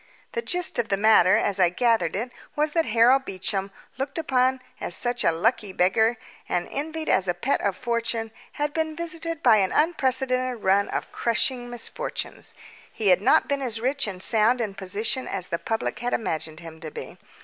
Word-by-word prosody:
The 470 - -2
gist 360 - 0
of 230 - -1
the 195 - +1
matter, 205 -3 +5
as 200 -1 0
I 180 -2 +5
gathered 225 -2 +1
it, 235 +5 -3 0.2
was 300 0 +1
that 330 +1 +1
Harold 240 +4 +4
Beecham, 195 -2 -2 0.3
looked 270 +3 -3
upon 260 -4 +1 0.2
as 175 - -2
such 245 0 +1
a - - +4
"lucky 205 +4 0
beggar", 220 +6 +2 0.3
and 175 0 -1
envied 315 +2 -4
as 190 0 +2
a 175 - 0
pet 245 +11 0
of 200 -2 0
fortune, 230 -2 -2 0.2
had 295 0 -2
been 315 -1 -1
visited 330 -1 -4
by 230 -4 +6
an 190 -2 +2
unprecedented 260 -6 +1
run 195 +1 +3
of - - -4
crushing 245 +1 -1
misfortunes. 240 -1 -5 0.4
He 215 -3 0
had 180 0 +5
not 270 +8 +4
been 280 -1 -1
as 235 -4 -1
rich 270 +2 0
and 190 -2 -4
sound 225 +2 +3
in 215 -4 -2
position 205 +7 -2
as 185 -2 -3
the 170 - -2
public 225 0 -2
had 245 0 0
imagined 160 -5 -4
him 160 -1 -11
to 155 - -6
be. - - -9
230 Hz, 190 wpm, -25 LUFS, 195-265 Hz, 0.4 s, by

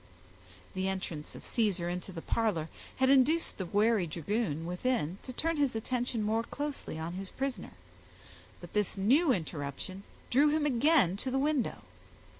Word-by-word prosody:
The 190 0 -1
entrance 180 -5 -4
of - - -10
Caesar 200 -7 0
into 180 +2 -4
the 165 -3 -7
parlor 190 -9 0 0.3
had 260 0 +3
induced 275 +3 +3
the 185 - -3
wary 210 -1 +3
dragoon 165 0 -2
within 180 -1 -1
to - - -7
turn 325 +5 -1
his 280 -5 +1
attention 240 0 -1
more 220 +2 +1
closely 285 - -5
on 160 +2 -4
his 190 +1 -5
prisoner; 270 -1 -4 0.9
but - - -11
this 210 -1 0
new 265 - +4
interruption 160 - -3 0.3
drew 285 +4 +5
him 305 0 +1
again 260 - +4
to 260 - -3
the 260 - 0
window. 270 - 0
215 Hz, 155 wpm, -31 LUFS, 180-265 Hz, 0.9 s, drew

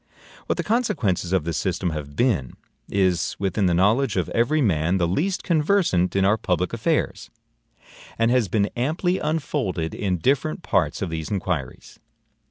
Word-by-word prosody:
What - - 0
the - - -1
consequences 125 - 0
of 95 -4 +2
this 85 0 -2
system 90 - -1
have 75 -2 -6
been, 95 - +1 0.4
is 95 -3 +1
within 100 0 0
the 85 - +2
knowledge 110 +10 +2
of - - 0
every 120 +7 +1
man 90 - +2
the 85 -2 +1
least 175 - -1
conversant 155 - +2
in 95 -1 +3
our 105 +3 +3
public - - -1
affairs, - - -1 0.9
and 115 +1 +2
has 125 -4 +2
been 100 +2 0
amply 160 +9 0
unfolded 140 - -2
in 95 -3 -1
different 120 - 0
parts - - 0
of - - -3
these 80 -1 -4
inquiries. 90 -10 -4
100 Hz, 160 wpm, -23 LUFS, 85-135 Hz, 0.9 s, in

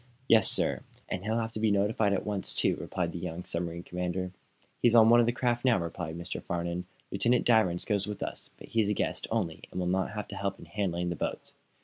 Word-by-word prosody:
"Yes, 110 -4 +6
sir; - - 0 0.3
and 90 - -3
he'll 110 +2 0
have 115 -1 -1
to 110 - -5
be 110 0 +3
notified 105 +1 +2
at 100 - 0
once, 105 -2 -2
too," - - +2
replied 85 -2 -2
the 85 - -5
young 90 0 -5
submarine 85 0 -3
commander. 90 +1 -3 0.5
"He's 120 -1 +5
on 115 0 +8
one 120 - +8
of 120 - +4
the - - +4
craft 120 0 0
now," 125 -3 +4
replied 85 -1 -4
Mr. 85 +1 -5
Farnum. 85 +1 -3 0.2
"Lieutenant 120 +6 +2
Danvers 110 -7 +3
goes 100 -2 0
with 105 -1 -4
us, - - -5
but - - -12
he's 110 -3 +2
a 105 - +1
guest, - - -1
only, 95 -8 -2
and - - -5
will 90 - 0
not 95 +2 +1
have 105 -1 -4
to 100 - -6
help 100 0 -2
in - - -12
handling 90 -1 -1
the 85 - -2
boats. - - -4
95 Hz, 235 wpm, -30 LUFS, 90-110 Hz, 0.5 s, on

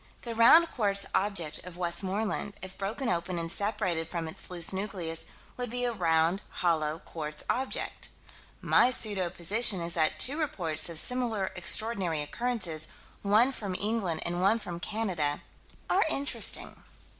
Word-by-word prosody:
The 235 - -5
round 315 +9 +6
quartz 200 -4 +2
object 190 -6 0
of 180 -1 -10
Westmoreland, 190 +4 -2
if 190 0 -6
broken 220 +7 -4
open 175 0 -1
and 165 0 -3
separated 190 -6 -1
from 165 -2 -4
its 160 - -7
loose 175 0 +3
nucleus, 190 -5 -3 0.3
would 245 -1 -4
be 245 +2 -3
a 240 - -1
round, 170 -1 +1
hollow, 160 -3 0
quartz 150 -2 -5
object. 260 +2 -1 0.5
My 245 - +4
pseudo 205 -7 +1
position 200 +4 +2
is 170 0 -2
that 155 -2 +1
two 285 +5 +1
reports 175 - +1
of 165 - -1
similar 225 -2 +2
extraordinary 190 -4 +2
occurrences, 180 -4 -1 0.3
one 215 +6 +4
from 200 -8 -4
England 200 -5 -1
and 175 +1 -2
one 200 +4 +4
from 175 -6 -7
Canada 180 -9 -2 0.4
are 390 - +3
interesting. 285 -2 0
190 Hz, 145 wpm, -29 LUFS, 170-225 Hz, 0.5 s, round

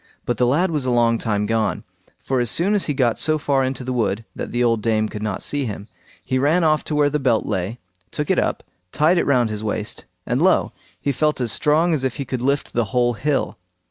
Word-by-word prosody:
But 120 - -1
the 125 - +2
lad 170 +8 +2
was 150 -4 -1
a - - +2
long 115 -1 +2
time 105 -2 -1
gone, 110 0 -1 0.4
for 130 -1 0
as 120 -2 +1
soon 185 - +2
as 205 - +2
he 145 - 0
got 120 -4 +1
so 155 0 +3
far 140 -2 +1
into 130 0 -2
the 130 0 -3
wood, 115 -2 -1
that - - -5
the 120 +1 0
old 115 -2 +2
dame 110 -1 +1
could 105 - -7
not 105 -3 -3
see 145 -2 -1
him, 105 -2 -6 0.4
he 130 - 0
ran 155 +6 +2
off 155 -1 +2
to 150 - -2
where 145 -1 +4
the 150 - 0
belt 125 -5 +1
lay, 95 +6 -2 0.3
took - - -2
it - - +3
up, - - -1 0.3
tied 165 +4 +3
it - - -1
round 125 -5 +2
his 105 0 -4
waist, 105 -1 -3 0.2
and - - 0
lo! - - +3 0.3
he 140 - -1
felt 150 +2 0
as 120 -3 -1
strong 160 +6 +2
as 145 -4 -1
if 130 -2 -1
he 140 - -4
could 130 -1 -4
lift 140 +2 -1
the 120 -1 +1
whole 120 +3 +1
hill. 120 -3 -1
125 Hz, 245 wpm, -21 LUFS, 115-145 Hz, 0.4 s, where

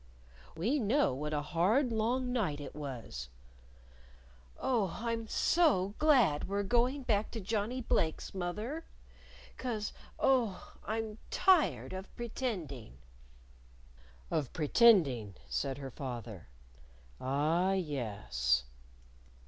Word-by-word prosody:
"We 235 - +1
know 230 - +2
what 150 +3 -4
a 150 -1 -1
hard 200 - +2
long 245 +3 0
night 185 -12 0
it 145 - -7
was." 125 - -6 1.3
"Oh, 215 -9 0
I'm 230 -1 -2
so 215 - +3
glad 255 - +4
we're 200 +1 0
going 245 +6 +1
back 215 -3 +1
to 230 - -3
Johnnie 220 +5 -2
Blake's, 160 -7 0
moth 175 -1 -3
er. 280 +10 -4 0.7
'Cause, 220 -5 -3 0.2
oh, 245 -8 +1
I'm 220 0 -3
tired 370 - +3
of 190 +1 -6
pretending!" 185 - -4 1.3
"Of 140 -5 -1
pretending," 150 - +4
said 135 -2 -2
her 135 -2 -6
father. 120 - -6 0.7
"Ah, 155 +8 +1
yes." 100 - 0
195 Hz, 105 wpm, -33 LUFS, 145-235 Hz, 1.3 s, glad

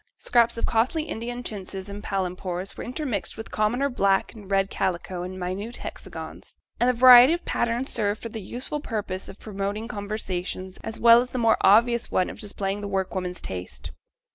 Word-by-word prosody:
Scraps 235 -1 +3
of - - 0
costly 250 +8 +1
Indian 240 -2 -5
chintzes 195 -3 -6
and 205 +1 -7
palempours 185 -1 -3
were - - -6
intermixed 250 - -3
with 225 - -8
commoner 235 +6 +1
black 200 -7 +1
and 210 -4 -12
red 195 0 +1
calico 180 0 -2
in 185 +1 -6
minute 190 +6 -4
hexagons; - - -8 0.2
and 245 - +4
the - - +3
variety 250 +3 +9
of 345 - -4
patterns 235 +3 -1
served 205 0 0
for 230 - -6
the 220 0 -6
useful 250 +9 -5
purpose 205 -8 -4
of 195 - -10
promoting 205 +1 -4
conversation 200 -4 -4
as 225 - -5
well 235 0 +8
as 250 - -5
the 255 - -5
more 230 -2 +4
obvious 235 +4 +4
one 185 - +1
of - - -12
displaying 200 -1 -3
the 205 - -4
work 190 -1 -2
woman 180 -1 -3
's - - -6
taste. 80 -7 -6
210 Hz, 190 wpm, -25 LUFS, 190-235 Hz, 0.2 s, variety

